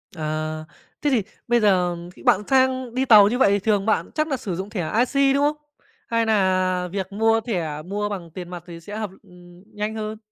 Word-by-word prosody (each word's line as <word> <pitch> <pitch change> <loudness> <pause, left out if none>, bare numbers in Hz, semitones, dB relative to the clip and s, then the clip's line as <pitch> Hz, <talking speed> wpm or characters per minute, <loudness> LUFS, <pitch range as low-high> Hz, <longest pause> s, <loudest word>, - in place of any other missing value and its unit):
À. 155 0 -3 0.4
Thế 295 - +1
thì 235 -7 +2 0.2
bây 240 0 +3
giờ 185 -4 +2 0.2
khi - - -15
bạn 190 - +4
sang 260 -2 +2
đi 260 +1 +1
tàu 210 -5 +8
như 240 +4 0
vậy 205 - +4
thì 200 - +2
thường 205 -1 +1
bạn 220 - +1
chắc 310 0 +1
nà 275 -4 -1
sử 190 -6 -4
dụng 190 +3 -5
thẻ 185 -7 -3
IC, 275 +2 +3
đúng 280 - +2
không? 300 +1 +1 0.5
Hay 230 -1 +1
nà 185 -4 +1
việc 190 0 -4
mua 225 +2 +2
thẻ 170 -10 -3
mua 205 +5 -3
bằng 175 -5 -6
tiền 175 +1 -8
mặt 175 -2 -8
thì 170 -1 -9
sẽ 205 +6 -8
hợp 215 -3 -3
ừm, 180 -1 -17
nhanh 210 +1 -3
hơn? 215 0 -4
205 Hz, 220 wpm, -23 LUFS, 180-230 Hz, 0.5 s, tàu